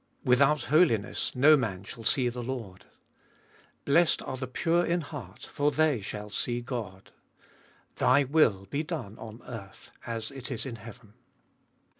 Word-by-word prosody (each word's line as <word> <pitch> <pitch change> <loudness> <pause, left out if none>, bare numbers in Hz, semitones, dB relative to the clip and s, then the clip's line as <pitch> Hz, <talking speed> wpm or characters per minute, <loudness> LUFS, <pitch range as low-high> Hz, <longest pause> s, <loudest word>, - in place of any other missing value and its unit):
" - - -38
Without 140 +1 +4
holiness 135 - +2
no 145 +5 +7
man 105 -9 -2
shall 115 +3 -9
see 125 +3 +3
the 120 0 -3
Lord." 115 -7 -6 0.5
" - - -32
Blessed 165 +4 +3
are 130 - -4
the 130 0 -5
pure 170 +6 +1
in 175 0 0
heart 135 - -9
for 145 +1 0
they 150 -6 +2
shall 105 +1 -6
see 120 +2 -1
God." 115 -6 -6 0.4
" - - -32
Thy 140 +3 +4
will 130 -9 +3
be 145 - 0
done 150 - -5
on 110 +1 -10
earth 100 -5 -9 0.2
as 115 0 -4
it 135 -1 -8
is 125 -2 -3
in 120 -4 -6
heaven." 115 -1 -13
125 Hz, 165 wpm, -28 LUFS, 110-145 Hz, 0.5 s, no